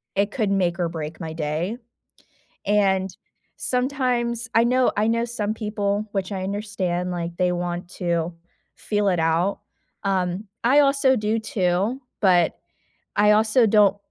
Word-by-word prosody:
it 200 Hz, +1 st, +1 dB
could 215 Hz, -5 st, -1 dB
make 180 Hz, -3 st, +1 dB
or 175 Hz, -1 st, 0 dB
break 160 Hz, -1 st, -6 dB
my 160 Hz, -1 st, -5 dB
day. 160 Hz, +7 st, -2 dB, 0.9 s
And 195 Hz, -2 st, +2 dB, 0.5 s
sometimes, 250 Hz, -3 st, -1 dB
I 230 Hz, -, +5 dB
know 250 Hz, +1 st, +3 dB
I 210 Hz, +1 st, +2 dB
know 230 Hz, +1 st, +1 dB
some 215 Hz, -3 st, -2 dB
people, 210 Hz, -1 st, -2 dB
which 195 Hz, 0 st, -2 dB
I 190 Hz, -1 st, -3 dB
understand, 190 Hz, -3 st, -2 dB
like, 170 Hz, -1 st, -3 dB
they 180 Hz, 0 st, +1 dB
want 175 Hz, 0 st, -3 dB
to 170 Hz, -1 st, -1 dB, 0.4 s
feel 205 Hz, -1 st, 0 dB
it 180 Hz, -3 st, +1 dB
out, 165 Hz, +5 st, +1 dB, 0.4 s
um, 185 Hz, 0 st, 0 dB, 0.2 s
I 270 Hz, +5 st, +6 dB
also 275 Hz, -2 st, +3 dB
do 215 Hz, 0 st, 0 dB
too, 200 Hz, +3 st, 0 dB, 0.2 s
but 180 Hz, -4 st, +3 dB, 0.6 s
I 210 Hz, 0 st, +5 dB
also 220 Hz, +3 st, +4 dB
don't 205 Hz, -2 st, +4 dB
200 Hz, 145 wpm, -23 LUFS, 180-225 Hz, 0.9 s, I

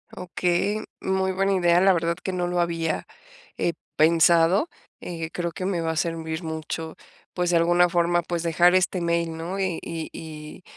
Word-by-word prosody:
Okey, 180 Hz, +3 st, -1 dB, 0.2 s
muy 190 Hz, 0 st, 0 dB
buena 195 Hz, +1 st, +1 dB
idea, 175 Hz, -1 st, +3 dB
la 195 Hz, -, +6 dB
verdad 170 Hz, -1 st, +1 dB
que 190 Hz, -, -2 dB
no 180 Hz, -1 st, -1 dB
lo 175 Hz, 0 st, 0 dB
había, 165 Hz, -1 st, -1 dB, 0.5 s
eh, 170 Hz, -, 0 dB, 0.2 s
pensado, 170 Hz, -, +4 dB, 0.3 s
eh, 165 Hz, -2 st, -5 dB
creo 170 Hz, -1 st, -2 dB
que 185 Hz, +2 st, -5 dB
me 185 Hz, -3 st, -1 dB
va 165 Hz, -, -1 dB
a -, -, -4 dB
servir 160 Hz, 0 st, -2 dB
mucho, 160 Hz, 0 st, -5 dB, 0.4 s
pues, 180 Hz, -1 st, 0 dB
de 175 Hz, -, +4 dB
alguna 175 Hz, +1 st, +4 dB
forma, 175 Hz, 0 st, +2 dB
pues, 170 Hz, 0 st, -3 dB
dejar 175 Hz, +2 st, +4 dB
este 185 Hz, 0 st, +1 dB
mail, 170 Hz, -1 st, 0 dB
¿no? 170 Hz, +4 st, -5 dB
Y 185 Hz, -4 st, -1 dB
y 165 Hz, -1 st, -5 dB
y 155 Hz, +2 st, -9 dB
170 Hz, 180 wpm, -24 LUFS, 165-180 Hz, 0.5 s, la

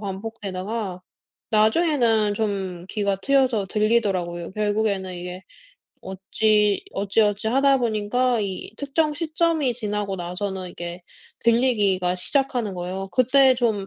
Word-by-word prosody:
반복되다가 195 Hz, -1 st, -5 dB, 0.5 s
나중에는 225 Hz, -2 st, +3 dB
좀 190 Hz, -5 st, -3 dB
귀가 200 Hz, -2 st, -1 dB
트여서 260 Hz, -7 st, +2 dB
들리더라고요. 195 Hz, -6 st, 0 dB
결국에는 205 Hz, -3 st, -1 dB
이게 180 Hz, +1 st, -7 dB, 0.6 s
어찌 205 Hz, +2 st, +1 dB
어찌어찌 205 Hz, +2 st, +1 dB
하다 270 Hz, +2 st, +4 dB
보니까 235 Hz, +2 st, +1 dB
이 195 Hz, 0 st, -4 dB
특정 300 Hz, +2 st, 0 dB
시점이 320 Hz, -3 st, 0 dB
지나고 210 Hz, -4 st, -3 dB
나서는 185 Hz, +1 st, -4 dB
이게 175 Hz, +1 st, -7 dB, 0.4 s
들리기가 210 Hz, -7 st, +2 dB
시작하는 240 Hz, 0 st, -1 dB
거예요. 185 Hz, +2 st, -5 dB
그때 260 Hz, +2 st, +5 dB
좀 220 Hz, -5 st, 0 dB
210 Hz, 285 characters per minute, -23 LUFS, 190-240 Hz, 0.6 s, 그때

